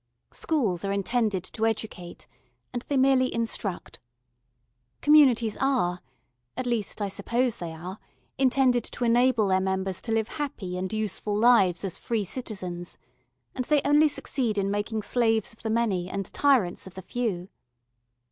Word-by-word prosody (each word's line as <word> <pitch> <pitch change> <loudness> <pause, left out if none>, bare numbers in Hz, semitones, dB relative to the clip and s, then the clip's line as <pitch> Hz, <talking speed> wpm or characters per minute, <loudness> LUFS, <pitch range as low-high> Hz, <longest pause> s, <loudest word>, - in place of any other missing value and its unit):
Schools 220 - -1
are 195 - -1
intended 200 -1 0
to 215 +3 -6
educate, 210 -5 -5 0.5
and 245 - -2
they 285 - 0
merely 260 -1 +4
instruct. 225 -5 -3 1.0
Communities 260 -8 +5
are, 210 -11 +1 0.6
at 255 - -2
least 225 -3 -1
I - - 0
suppose 235 +4 -1
they 170 -2 -5
are, 180 +5 -8 0.4
intended 255 -2 +3
to 245 - -3
enable 235 -2 +3
their 190 0 +3
members 190 -1 -2
to 230 - -5
live 220 -1 +1
happy 200 -11 -4
and 185 0 -3
useful 215 -1 -2
lives 205 -6 +4
as 185 - -4
free 225 -3 -1
citizens, 185 -6 -6 0.6
and 255 - -3
they 295 +1 +3
only 295 +2 +5
succeed 250 -6 -2
in 195 0 0
making 210 +1 -2
slaves 225 -2 +1
of 225 - -17
the 220 - -3
many 210 -6 0
and 195 0 -3
tyrants 245 -12 +2
of 190 - -12
the 190 - -8
few. 200 -7 -3
220 Hz, 150 wpm, -26 LUFS, 190-245 Hz, 1.0 s, Communities